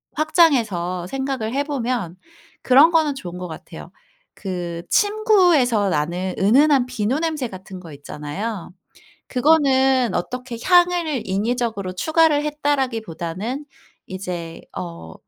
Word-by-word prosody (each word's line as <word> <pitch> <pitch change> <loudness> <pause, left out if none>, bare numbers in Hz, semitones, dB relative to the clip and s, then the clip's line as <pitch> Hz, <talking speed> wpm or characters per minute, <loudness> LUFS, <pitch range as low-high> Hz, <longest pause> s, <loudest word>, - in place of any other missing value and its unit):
확장해서 225 - +2
생각을 265 -1 -3
해보면 250 - -2 0.5
그런 275 +5 +7
거는 315 -3 +2
좋은 180 -9 -7
것 180 - -6
같아요. 160 - -10 0.4
그 175 -3 -5
침구에서 360 - +3
나는 175 +4 -1
은은한 260 +5 +4
비누 250 +2 -1
냄새 315 -5 -2
같은 190 -1 -10
거 165 -4 -11
있잖아요. 150 +8 -6 0.6
그거는 265 -3 +3
어떻게 250 -1 -4
향을 350 - +3
인위적으로 205 -1 -2
추가를 315 - +2
했다라기보다는 250 - -2 0.4
이제 180 -3 -6 0.2
어 85 -3 -7
240 Hz, 265 characters per minute, -21 LUFS, 185-290 Hz, 0.6 s, 그런